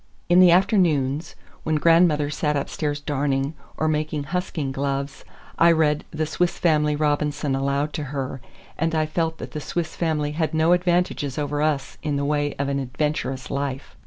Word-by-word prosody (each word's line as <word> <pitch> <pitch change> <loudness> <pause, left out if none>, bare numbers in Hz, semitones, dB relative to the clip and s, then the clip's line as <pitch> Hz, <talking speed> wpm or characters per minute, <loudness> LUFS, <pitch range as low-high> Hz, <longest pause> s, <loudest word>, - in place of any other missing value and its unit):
In 175 +1 +6
the 185 -1 +8
afternoons, 170 -6 +2 0.3
when 155 - -1
grandmother 155 -2 +4
sat 150 0 0
upstairs 145 +1 -2
darning, 140 0 -1 0.2
or 155 - 0
making 150 -1 -1
husking 155 -3 -3
gloves, 140 0 -3 0.4
I 170 0 +7
read 155 -2 +2
"The 155 0 -2
Swiss 175 +3 -1
Family 150 -3 +2
Robinson" 150 -1 0
aloud 140 +2 0
to 150 - -3
her, 135 -1 -4 0.4
and 165 +1 0
I 155 -1 +2
felt 160 +1 -1
that - - -8
the 150 - -5
Swiss 165 +1 -3
family 155 -3 -1
had 160 +1 -1
no 160 +2 +4
advantages 175 -6 0
over 145 0 -1
us 150 -3 -1
in 150 -2 -1
the 140 0 -1
way 145 0 0
of 140 - -2
an 140 0 -1
adventurous 135 -1 -2
life. 140 -1 -4
150 Hz, 170 wpm, -23 LUFS, 140-160 Hz, 0.4 s, the